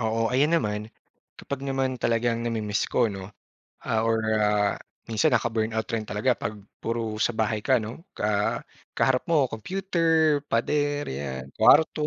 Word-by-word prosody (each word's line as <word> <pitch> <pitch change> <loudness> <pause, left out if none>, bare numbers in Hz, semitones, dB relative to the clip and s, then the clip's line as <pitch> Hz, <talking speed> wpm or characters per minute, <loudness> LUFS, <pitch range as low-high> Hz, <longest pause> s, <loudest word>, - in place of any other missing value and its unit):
Oo. 115 +1 0
Ayan 145 +6 +3
naman, 105 -5 -2 0.5
kapag 140 -1 -6
naman 135 -2 -2
talagang 115 0 +1
nami-miss 110 -3 -1
ko, 115 -4 +2
'no? 95 -1 -7 0.5
Ah, 110 -1 0
or 115 -1 +1 0.2
ah, 105 -1 +2 0.3
minsan 110 -1 +2
nakaka-burnout 110 -1 0
rin 110 -2 -2
talaga 110 +5 0
'pag 110 - -3 0.2
puro 115 -2 -3
sa 120 +1 +1
bahay 110 -1 0
ka, 125 +2 +2
'no, 120 - -8
ka, - - -7
ah, 105 0 +1 0.4
kaharap 130 -1 +2
mo 150 -6 +2
computer, 165 - +1
pader, 145 +5 0
'yan, 65 -1 -5
kwarto, 155 -1 +5
115 Hz, 150 wpm, -26 LUFS, 110-135 Hz, 0.5 s, kwarto